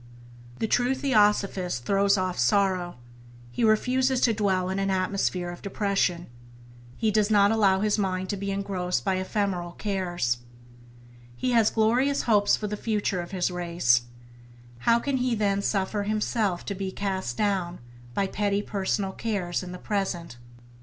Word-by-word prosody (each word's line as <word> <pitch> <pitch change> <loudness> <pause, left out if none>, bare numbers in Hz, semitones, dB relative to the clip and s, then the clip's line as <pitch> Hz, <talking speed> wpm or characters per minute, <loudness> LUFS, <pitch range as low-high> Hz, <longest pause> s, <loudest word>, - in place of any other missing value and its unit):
The - - -1
true 245 +4 +2
Theosophist 205 - +1
throws 200 +3 +3
off 185 -4 -2
sorrow, 180 +6 +1 0.6
he 120 - -2
refuses 255 +4 +2
to 230 - +4
dwell 190 -4 0
in 190 - -2
an 195 0 0
atmosphere 185 -2 -1
of 175 - -10
depression. 195 -4 0 0.7
He 220 - +1
does 210 0 +2
not 205 -1 +5
allow 195 -4 +3
his 210 0 +1
mind 185 -1 -1
to - - -1
be 200 0 -4
engrossed 195 -2 -2
by 190 -1 +1
ephemeral 185 -2 -2
cares. 175 - -1 1.0
He 250 - -1
has 230 -3 +4
glorious 245 +6 +2
hopes 205 -3 +3
for 215 - -5
the 210 0 -3
future 205 -4 -1
of 175 - -8
his 185 -2 -1
race: 170 -9 +2 0.8
how 230 - +4
can 270 +3 -1
he 250 -2 0
then 200 -2 +1
suffer 200 +1 -1
himself 210 -2 -1
to 200 - -3
be 190 0 -4
cast 190 -11 -3
down 185 -4 0 0.4
by 200 - +1
petty 205 +1 -1
personal 195 -1 -1
cares 190 -5 -2
in 180 -1 -7
the 180 - -7
present 180 - -3
200 Hz, 155 wpm, -26 LUFS, 185-210 Hz, 1.0 s, not